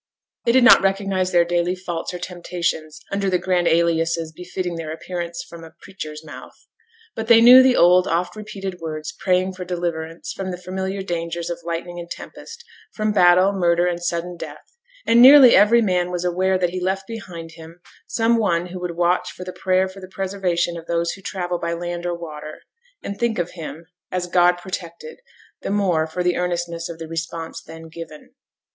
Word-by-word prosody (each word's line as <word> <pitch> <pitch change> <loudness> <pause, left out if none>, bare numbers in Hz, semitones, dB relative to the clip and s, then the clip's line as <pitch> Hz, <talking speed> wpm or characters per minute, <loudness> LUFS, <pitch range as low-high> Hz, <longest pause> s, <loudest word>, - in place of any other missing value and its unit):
They 235 - +4
did 255 +1 +5
not 250 - +8
recognize 195 -1 0
their 175 -1 +4
daily 175 +1 0
faults 175 -3 -5
or 180 - -5
temptations 175 -3 -4
under 200 -1 0
the 185 - +2
grand 180 -1 0
aliases 165 -1 +1
befitting 180 +2 -5
their 165 -2 -5
appearance 170 +1 -5
from 170 -1 -11
a 165 +1 -13
preacher's 155 -5 -8
mouth. 150 - -11 0.6
But 225 - -4
they 230 -1 +7
knew 245 +3 +9
the 260 -1 +4
old, 180 +1 +5
oft 175 +2 -1
repeated 195 -4 -7
words 155 -1 -5
praying 185 0 +1
for 185 0 -7
deliverance 170 -2 -4
from 195 -1 -5
the 180 - -4
familiar 190 +2 -4
dangers 170 -1 -3
of 170 - -5
lightning 170 +1 -5
and 170 0 -8
tempest; 460 - -10 0.3
from 215 -1 -1
battle, 185 0 +5
murder, 175 -2 +2
and 175 -1 -1
sudden 175 0 -3
death; 475 - -10 0.3
and 235 +1 +5
nearly 265 -1 +9
every 215 +4 +5
man 180 -3 +1
was 180 0 -3
aware 185 +2 +1
that 180 -2 0
he 185 0 -4
left 190 +1 -1
behind 185 -7 -8
him 165 +1 -13 0.3
some 230 0 +2
one 175 -5 0
who 180 +1 -7
would 175 -1 -5
watch 175 +1 +1
for 180 - -9
the 185 0 -7
prayer 185 0 +1
for 190 +1 -11
the 185 - -10
preservation 185 -3 -1
of 165 - -10
those 170 0 0
who 195 - -10
travel 180 -2 -3
by 170 0 -2
land 175 +1 -4
or 175 - -1
by 170 - -12
water, 155 -2 -8 0.4
and 200 - -6
think 235 -2 0
of 175 0 -2
him, 165 -1 -8 0.3
as 180 -1 -1
God 175 0 +3
protected 175 - -7 0.4
the - - -4
more 185 -6 +1
for 180 +3 -3
the 180 0 +1
earnestness 175 -1 -2
of 170 - -7
the 165 -1 -7
response 165 0 -5
then 160 0 -11
given. 160 -2 -11
175 Hz, 195 wpm, -21 LUFS, 170-190 Hz, 0.6 s, knew